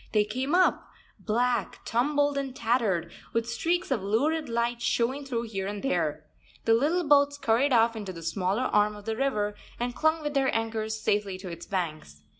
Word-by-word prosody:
They 210 -1 +4
came 260 +9 -1
up, 370 0 +3 0.3
black, 240 +2 -1
tumbled, 285 +4 +1
and 275 -2 -3
tattered, 220 - 0 0.2
with 230 0 0
streaks 340 +8 -1
of 245 -7 +1
lurid 280 +11 0
light 235 +1 -1
showing 255 +4 0
through 240 -3 -2
here 195 -4 -4
and 205 0 -5
there. 155 - -1 0.4
The 225 - +5
little 305 +10 +2
boats 285 0 +5
scurried 270 +1 +2
off 230 -1 +4
into 205 -4 -5
the 165 -2 -9
smaller 195 +7 0
arm 210 -3 +2
of 205 0 -12
the 225 -1 -2
river 215 -5 0 0.3
and 245 +1 -2
clung 315 +3 +1
with 295 0 -2
their 270 -2 +2
anchors 220 -1 -2
safely 205 -3 0
to 185 -1 -8
its 170 -1 -8
banks. 155 - -4
230 Hz, 185 wpm, -28 LUFS, 205-275 Hz, 0.4 s, The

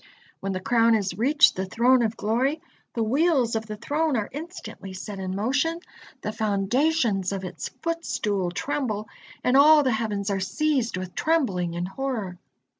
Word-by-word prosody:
When 195 - -3
the 185 - -2
crown 230 +3 +3
has 200 -3 -1
reached 280 +8 +4
the 190 0 -3
Throne 245 +6 +4
of 225 -1 -1
Glory, 255 +8 0 0.4
the 230 - +1
wheels 265 -1 +2
of 220 0 -2
the 215 -1 -6
Throne 295 +4 0
are 210 - -2
instantly 310 - -8
set 195 +1 -7
in 185 0 -3
motion, 265 - 0 0.4
the 215 - -2
foundations 215 - +1
of 195 -1 -4
its 175 -4 -6
footstool 215 - -1
tremble, 215 +1 -2 0.4
and 250 - +2
all 300 +2 +7
the 260 - +2
heavens 215 -3 -1
are 195 - 0
seized 240 +4 0
with 185 -1 -6
trembling 195 - 0
and 175 +1 -2
horror. 210 -5 -4
225 Hz, 165 wpm, -25 LUFS, 195-275 Hz, 0.4 s, all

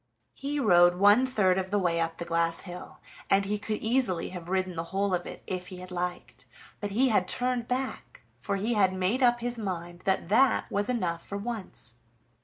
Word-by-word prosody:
He 285 +1 -3
rode 175 -7 +5
one 205 +7 +5
third 190 -7 +2
of 190 0 -3
the 205 - +1
way 175 -4 +1
up 165 0 -2
the 170 - -5
glass 165 0 +1
hill, 180 -1 -9 0.3
and 195 0 +3
he 210 +1 -1
could 210 +1 -4
easily 225 -7 +2
have 175 -2 -8
ridden 185 -1 -1
the 165 0 -3
whole 195 +2 -1
of 175 -1 -1
it - - -9
if 180 -1 -4
he 185 - -8
had 180 0 -10
liked; 180 0 -5 0.3
but 205 - -3
he 250 +6 +3
had 190 -5 +2
turned 245 +2 0
back, 260 +1 -4
for 200 - -3
he 210 +5 0
had 195 -4 +3
made 190 +7 0
up 240 -1 +4
his 240 0 -2
mind 175 -4 -5
that 190 -3 +1
that 255 +6 +3
was 205 +3 0
enough 180 -9 -1
for 200 - -5
once. 200 - -5
195 Hz, 205 wpm, -28 LUFS, 180-230 Hz, 0.3 s, rode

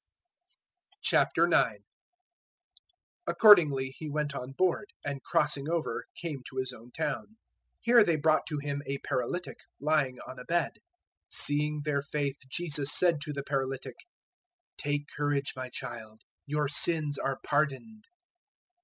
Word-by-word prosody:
009:001 - - +3 1.4
Accordingly 155 -11 +6
He 155 - -6
went 150 -1 -1
on 130 -1 -5
board, 185 +6 +1 0.2
and 140 -1 -3
crossing 150 +1 +1
over 170 -1 -1
came 155 -6 -4
to 130 - -11
His 130 -1 -2
own 120 +1 -14
town. 155 0 -2
009:002 220 - -25 0.5
Here 235 -1 +6
they 170 -5 +2
brought 155 +1 +2
to 150 - -2
Him 145 0 -3
a 140 - -1
paralytic 135 +7 -3 0.2
lying 145 -4 +1
on 130 - -9
a - - -7
bed. 170 0 0 0.5
Seeing 150 +1 +1
their 145 -2 +1
faith 140 -1 -2
Jesus 150 -2 0
said 170 -3 +3
to 150 0 -4
the 140 -1 -4
paralytic, 135 -2 -3 0.8
"Take 145 0 -2
courage, 145 -1 0
my 130 0 -5
child; 110 -3 -8 0.2
your 150 0 0
sins 150 0 +1
are 135 0 -1
pardoned." 155 - -1
145 Hz, 135 wpm, -30 LUFS, 135-155 Hz, 1.4 s, Accordingly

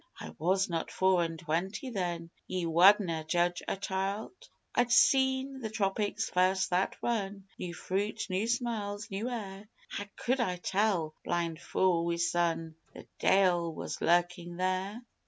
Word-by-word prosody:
I - - -8
was 190 +4 +2
not 165 -2 -2
four 190 -1 +3
and 165 -1 -3
twenty 175 - -2
then 175 -5 -3 0.2
Ye 185 -2 -2
wadna' 170 0 +5
judge 175 +1 +1
a - - -1
child? 195 +2 -2 0.4
I'd 245 0 +2
seen 265 +1 +4
the 225 -4 -4
Tropics 205 0 -1
first 185 +1 +2
that 180 +2 +1
run 205 -4 -1 0.2
new 175 -1 -5
fruit, 200 +5 -2
new 195 +3 -1
smells, 220 -4 -2
new 205 +5 -2
air 205 -3 -6 0.2
How 205 - -4
could 255 +2 0
I 185 -7 +1
tell 185 -3 0
blind 170 -2 -2
fou 180 -3 +2
wi' 170 0 0
sun 170 -1 0 0.2
the - - -10
Deil 180 -3 +3
was - - -5
lurkin' 175 0 +1
there? 185 +5 -1
190 Hz, 150 wpm, -31 LUFS, 175-210 Hz, 0.4 s, wadna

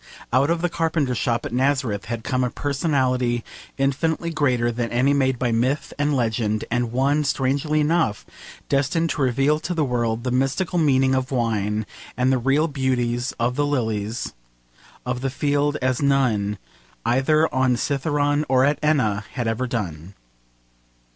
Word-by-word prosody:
Out 135 +4 +3
of 170 0 0
the - - +3
Carpenter's 160 -7 0
shop 115 -1 0
at - - -5
Nazareth 130 -6 0
had 115 -1 -4
come 130 +1 0
a 125 - 0
personality 130 -4 0 0.3
infinitely 160 +5 0
greater 125 -6 +1
than 120 0 -2
any 130 +4 +2
made 130 -2 +1
by 120 -1 0
myth 125 +6 0
and 145 0 +1
legend, 110 -3 0
and 120 -1 0
one, 140 +4 +2
strangely 140 +3 0
enough, 155 -8 +1 0.4
destined 145 +4 +1
to 150 - -3
reveal 135 +4 +2
to 175 +3 -4
the 155 -3 +1
world 120 -2 -1
the 125 - -1
mystical 135 +8 0
meaning 135 -4 +3
of 130 0 0
wine 110 -4 -1 0.3
and 130 +1 +2
the 130 - +2
real 135 +6 +2
beauties 125 -4 -1
of 120 +1 -1
the 145 - +1
lilies 110 -5 -2 0.7
of 125 0 -2
the 135 - -1
field 145 +2 0
as 130 0 +1
none, 120 -8 +1 0.5
either 135 +6 +3
on 130 -1 +2
Cithaeron 145 +2 0
or 130 0 +4
at 145 0 +1
Enna, 110 -9 +1
had 120 -4 -2
ever 115 +3 -1
done. 95 - -5
130 Hz, 160 wpm, -23 LUFS, 120-145 Hz, 0.7 s, or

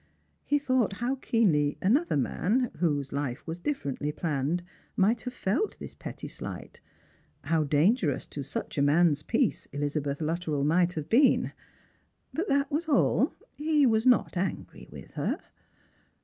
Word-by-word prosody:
He 290 - +2
thought 255 -7 +1
how 240 +6 -1
keenly 165 - +2
another 250 - +2
man, 220 - 0
whose 145 -6 0
life 140 -3 -3
was 165 +1 -5
differently 150 - -2
planned, 155 +2 -1 0.3
might 220 +4 +3
have 250 - -5
felt 250 - -1
this - - -8
petty - - -8
slight - - -8 0.3
— - - -37
how 160 -2 +3
dangerous 150 - +2
to 145 - -6
such 140 +1 -4
a - - +3
man's 150 +1 +4
peace 230 - 0
Elizabeth 145 0 -2
Luttrell 160 -2 -1
might 175 +4 +3
have 155 -3 -4
been; 260 - +4 0.8
but 345 +6 -2
that 280 -2 +1
was 320 +3 -1
all. 285 - +3 0.2
He 300 -1 +2
was 225 0 +3
not 250 -5 +4
angry 185 +2 -4
with - - -11
her. - - -1
175 Hz, 150 wpm, -28 LUFS, -, 0.8 s, man's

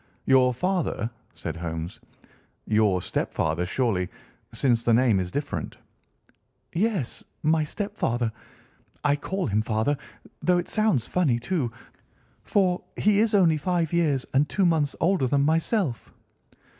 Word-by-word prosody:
"Your 130 -1 +5
father," 160 - -1 0.2
said - - -5
Holmes, 80 +1 -5 0.7
"your 105 -4 +2
stepfather, 80 +3 -1
surely, 95 -5 0 0.4
since 120 -4 +1
the 115 -1 +4
name 120 -5 +4
is 90 -1 -2
different." 145 +9 -4 1.0
"Yes, 185 - -1 0.2
my 155 +1 +3
stepfather. 145 - -2 0.7
I 145 -1 +3
call 190 +6 -3
him 105 +1 +1
father, 110 +6 0 0.5
though 180 0 +3
it 175 - -2
sounds 215 - +1
funny, 155 -10 +2
too, 125 0 -1 0.7
for 185 -3 +1
he 210 -1 +3
is 220 -1 +3
only 170 -5 +4
five 170 0 -1
years 150 -6 +2
and 140 +2 +3
two 195 - +1
months 155 -5 +2
older 170 -6 +2
than 140 +2 +2
myself." 160 - 0
145 Hz, 130 wpm, -26 LUFS, 115-180 Hz, 1.0 s, Your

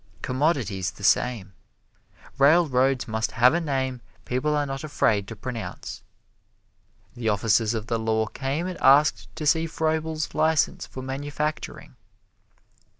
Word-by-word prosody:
Commodities 130 - 0
the - - -13
same. 105 -6 +1 0.9
Railroads 135 -4 +3
must 110 0 -2
have 125 +4 +5
a 170 - +1
name 130 -5 -2 0.2
people 140 +5 0
are 145 - 0
not 135 0 -5
afraid 105 -9 +1
to 115 - -7
pronounce. 115 +1 -6 1.1
The 115 -2 -2
officers 110 +2 +2
of 110 -1 -3
the 115 0 -1
law 110 0 +1
came 135 +8 -3
and 185 -1 -6
asked 145 +3 +4
to 155 - -5
see 160 +2 +3
Froebel's 160 -1 -2
license 160 -1 +1
for 130 - -8
manufacturing. 145 +3 -4
135 Hz, 130 wpm, -25 LUFS, 115-150 Hz, 1.1 s, have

